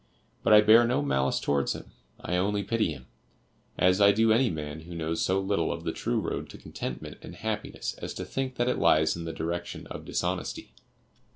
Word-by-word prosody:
But - - +1
I 105 0 +9
bear 110 +3 +7
no 125 +5 +1
malice 65 - +1
towards 70 -1 0
him; - - -10 0.3
I 90 - -2
only 100 +3 +1
pity 110 -3 0
him, 65 -4 -9 0.7
as 90 +2 +3
I 100 0 +8
do 110 +2 +3
any 120 +2 +3
man 75 -3 -5
who 85 +2 -10
knows 80 0 -2
so 95 +1 +2
little 95 -4 0
of 85 - -5
the 80 - -1
true 115 +7 -1
road 95 - -4
to - - -10
contentment 65 - -7
and - - -10
happiness 105 0 -4
as - - -5
to - - -5
think 130 -1 -3
that 120 - 0
it 125 - 0
lies 80 0 +4
in 85 0 -6
the 80 - -3
direction 85 +2 -4
of - - -6
dishonesty. - - -3
95 Hz, 205 wpm, -28 LUFS, 80-110 Hz, 0.7 s, I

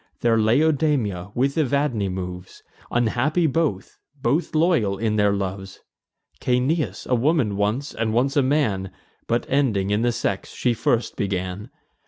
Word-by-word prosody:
There 115 -1 +3
Laodamia, 120 - +1
with 140 +5 +1
Evadne, 140 -8 0
moves, 90 0 -7 0.3
Unhappy 125 +8 +1
both, 150 - -1 0.2
but 155 +5 0
loyal 155 - +2
in 110 0 0
their 105 -1 +3
loves: 95 -1 -4 0.6
Caeneus, 125 - 0
a - - -1
woman 125 -4 +2
once, 110 +8 -1
and 115 -1 -1
once 125 +5 +1
a 145 - +4
man, 125 -9 0 0.4
But 120 +1 0
ending 110 -9 +1
in 105 +2 +1
the 120 0 +2
sex 100 -4 -3
she 125 - +1
first 115 +1 0
began. 95 +2 -3
115 Hz, 140 wpm, -23 LUFS, 100-140 Hz, 0.6 s, a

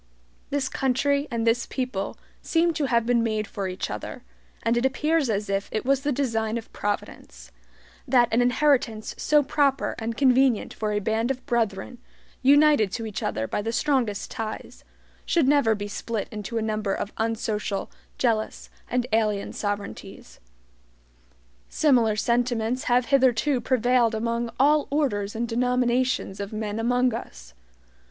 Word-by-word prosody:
This 280 -2 -1
country 280 +3 0
and 230 -1 -2
this 230 +1 +2
people 250 -7 -3 0.2
seem 335 0 +2
to 310 -2 -1
have 235 -3 +2
been 240 0 +2
made 215 -2 -1
for 200 -1 -4
each 185 0 -4
other, 105 0 -6 0.4
and 230 - +2
it 240 - +1
appears 300 +2 +1
as 210 -1 -1
if 195 0 -2
it 215 - -2
was 275 0 +2
the 290 +1 0
design 230 -5 -1
of 225 - -9
Providence, - - -5 0.6
that 245 -2 +4
an 235 - +4
inheritance 245 -4 +1
so 300 -1 +3
proper 280 -1 +1
and 225 0 -4
convenient 260 -3 +3
for 215 -1 -2
a 210 - 0
band 220 +3 0
of 265 -1 -3
brethren, 230 -2 -1 0.4
united 285 -6 +5
to 225 - -3
each 215 -2 -5
other 110 +1 -2
by - - -2
the 225 +2 -2
strongest 235 -6 0
ties, 220 -3 -6 0.4
should 330 -6 +2
never 275 -6 +4
be 205 0 -5
split 210 +1 -4
into 215 +2 -5
a 225 - 0
number 215 -2 -1
of 205 - -5
unsocial, 215 -3 -2 0.3
jealous, 225 -3 -1 0.2
and 245 0 0
alien 215 -2 +1
sovereignties. 205 -1 -6 1.3
Similar 240 -8 +3
sentiments 240 +1 0
have 245 0 +3
hitherto 260 0 +3
prevailed 245 -1 +2
among 235 +1 -1
all 295 +2 +4
orders 225 -9 -1
and 235 +1 -1
denominations 250 -2 0
of 200 0 -5
men 215 0 -3
among 245 +1 +2
us. - - -8
235 Hz, 150 wpm, -25 LUFS, 215-260 Hz, 1.3 s, united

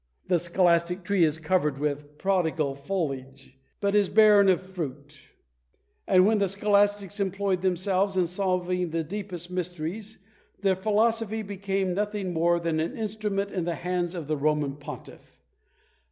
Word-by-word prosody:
The 175 - +3
scholastic 175 +1 +1
tree 195 -1 +2
is 155 -1 +2
covered 160 -3 0
with 145 0 -3
prodigal 160 -7 0
foliage, 135 -5 -5 0.2
but 200 0 0
is 205 -2 +3
barren 210 -2 +6
of 185 - +4
fruit; 150 -6 -7 0.9
and 185 -1 +5
when 215 +1 +3
the 200 - +2
scholastics 205 0 +1
employed 195 -1 0
themselves 190 +1 0
in 180 - +3
solving 180 -1 -1
the 165 0 -1
deepest 180 0 -6
mysteries, 180 +4 -4 0.4
their 195 -2 +3
philosophy 220 +2 +1
became 195 -2 -2
nothing 205 -1 -2
more 170 +1 +2
than 165 -2 -1
an 160 - -2
instrument 210 -2 -2
in 180 -3 -2
the 170 -1 -1
hands 180 0 -2
of 170 -4 -5
the 155 +1 -1
Roman 150 -1 0
Pontiff. 145 0 -11
185 Hz, 145 wpm, -27 LUFS, 165-200 Hz, 0.9 s, barren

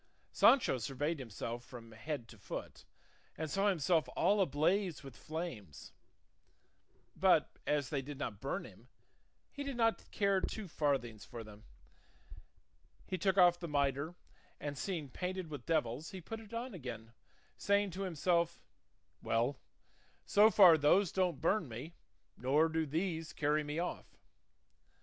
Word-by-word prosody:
Sancho 240 - +5
surveyed 140 +7 -2
himself 120 0 -5
from 120 -3 -11
head 120 +2 -5
to 110 - -14
foot - - -7 0.5
and 155 -1 -3
saw 195 +1 +2
himself 165 -2 +2
all 205 0 +3
ablaze 175 +2 +1
with 135 -2 -10
flames; 125 - -7 1.2
but - - +3
as 145 -3 +1
they 140 -3 0
did 140 +1 -8
not 115 -7 -5
burn 140 +8 -3
him, - - -15 0.6
he 285 - -5
did 275 -3 -4
not 225 -1 +1
care 200 -2 +2
two 215 0 -4
farthings 135 -9 -1
for 115 -2 -8
them. 105 0 -14 1.4
He 185 - -3
took 190 +2 +1
off 175 -2 +6
the 170 - -5
mitre, 145 +2 0 0.4
and 145 -1 -4
seeing 165 -1 -3
painted 180 +3 -4
with 140 -5 -7
devils 155 -2 0
he 190 - -7
put 225 +6 -7
it 220 -1 -13
on 235 +1 -4
again, 115 - -7 0.4
saying 200 -1 +1
to 185 +3 -6
himself, 170 -1 +1 0.6
"Well, 120 +5 0 0.7
so 210 +2 +6
far 180 -7 +8
those 170 +6 +4
don't 180 -6 0
burn 180 +1 +1
me 130 +9 -7 0.4
nor 145 +6 +2
do 160 -1 -1
these 165 +1 -2
carry 150 +1 +1
me 150 +1 -4
off." 175 +1 -4
160 Hz, 145 wpm, -35 LUFS, 135-185 Hz, 1.4 s, far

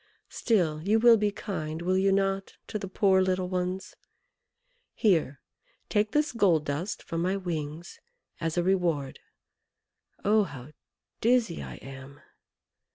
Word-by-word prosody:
Still 170 -10 +1
you 205 +6 +2
will 235 +1 +7
be 210 -1 +1
kind, 165 -6 -5
will 185 +1 +1
you 195 +1 +3
not, 195 0 0
to 215 - -4
the 195 - -5
poor 190 0 +3
little 185 -1 0
ones? 180 +1 -3 1.0
Here, 165 - +1 0.5
take 210 0 +2
this 300 +3 +1
gold 180 -10 +2
dust 155 +8 -3
from 165 0 -3
my 185 +3 0
wings 165 -3 -5 0.4
as 165 +1 -2
a 175 - +2
reward. 170 -7 0 1.1
Oh, 215 +2 +5
how 140 -3 -10 0.5
dizzy 230 -6 +2
I - - -7
am! 135 +1 -11
185 Hz, 135 wpm, -28 LUFS, 160-200 Hz, 1.1 s, will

